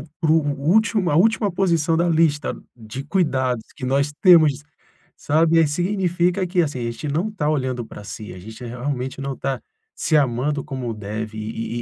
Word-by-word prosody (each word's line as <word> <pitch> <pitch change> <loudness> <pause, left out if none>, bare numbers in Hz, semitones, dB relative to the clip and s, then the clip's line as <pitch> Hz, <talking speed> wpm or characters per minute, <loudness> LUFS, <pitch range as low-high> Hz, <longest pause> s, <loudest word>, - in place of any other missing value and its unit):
o 145 - -9 0.2
para 155 - +1
o 160 - +5 0.3
último, 210 -3 +3
a 145 - +2
última 215 +2 +3
posição 170 -4 +1
da 170 +1 +2
lista 160 -3 +2 0.2
de 120 +4 -8
cuidados 130 - 0
que 130 - -6
nós 140 +2 +1
temos, 155 -6 +6 0.6
sabe. 160 +2 +2
Aí 160 - +4
significa 180 +2 0
que, 175 0 +2
assim, 145 -5 -2
a - - -2
gente 115 +6 -6
não 175 +9 -1
tá 150 -7 -1
olhando 130 -5 -1
para 105 - -11
si, 105 0 -8
a - - -10
gente, 110 +6 -10
eh, 120 - -5
realmente 125 +2 -4
não 135 0 -3
está 135 +1 -3 0.4
se 155 - 0
amando 140 +2 0
como 130 -5 -4
deve 110 +1 -5
e 115 +2 -4
145 Hz, 190 wpm, -22 LUFS, 125-170 Hz, 0.6 s, temos